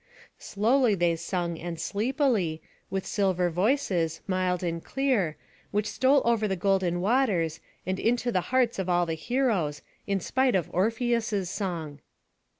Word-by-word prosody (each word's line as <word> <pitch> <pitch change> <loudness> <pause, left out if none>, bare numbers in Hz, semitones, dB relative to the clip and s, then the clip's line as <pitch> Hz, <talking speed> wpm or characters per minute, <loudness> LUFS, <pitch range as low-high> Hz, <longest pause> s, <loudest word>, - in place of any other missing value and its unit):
Slowly 225 +2 +2
they 175 -2 +2
sung 170 0 -3
and 170 -1 -5
sleepily, 215 - 0 0.3
with 195 -1 -3
silver 185 -4 +1
voices, 175 - +1
mild 185 -2 0
and 170 -1 -2
clear, 245 - 0 0.3
which 205 0 0
stole 265 +4 +3
over 230 -2 +2
the 190 - -1
golden 185 -2 +1
waters, 190 - +1 0.3
and 185 +1 -2
into 240 +1 +1
the 185 - +1
hearts 250 -4 +2
of 185 -1 -2
all 175 0 +3
the 165 - -2
heroes, 185 - -1 0.2
in 200 -1 +1
spite 260 +6 +1
of 175 -5 -1
Orpheus's 225 -2 0
song. 165 -8 -4
190 Hz, 145 wpm, -27 LUFS, 175-235 Hz, 0.3 s, stole